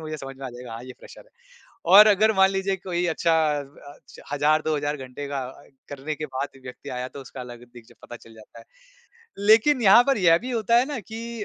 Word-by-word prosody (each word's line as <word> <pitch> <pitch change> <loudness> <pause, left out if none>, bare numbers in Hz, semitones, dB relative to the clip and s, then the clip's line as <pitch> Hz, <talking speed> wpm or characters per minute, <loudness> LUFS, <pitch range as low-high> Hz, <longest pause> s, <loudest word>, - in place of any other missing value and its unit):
मुझे 155 -1 -6
समझ 135 -2 -9
में 135 - -7
आ - - -7
जाएगा, 120 -1 -10
हाँ, 115 +1 -8
ये 130 - -10
फ़्रेशर - - -15
है। - - -27 0.7
और 210 +1 +10
अगर 215 +1 +4
मान 190 0 +5
लीजिए, 195 0 -2
कोई 180 -2 -3
अच्छा 165 0 0 0.3
व 140 0 -13 0.2
अच्छ - - -19
1000-2000 150 0 0
घंटे 130 +1 -8
का 140 -1 -3 0.2
अए - - -22 0.2
करने 145 +2 -6
के 155 - -5
बाद, 135 0 -6
व्यक्ति 125 -1 -11
आया, 125 0 -5
तो 140 - -11
उसका 130 0 -11
अलग 120 -1 -10
दिख 120 -2 -15
ज - - -19
पता 120 - -10
चल 115 -1 -18
जाता 110 -1 -16
है। - - -14 0.8
लेकिन 235 +5 +4
यहाँ 215 +3 +7
पर 275 - +2
यह 165 -3 +4
भी 250 +6 -7
होता 230 -1 +1
है 245 - +2
ना 250 - -4
कि 225 +2 -7
155 Hz, 230 wpm, -24 LUFS, 130-200 Hz, 0.8 s, और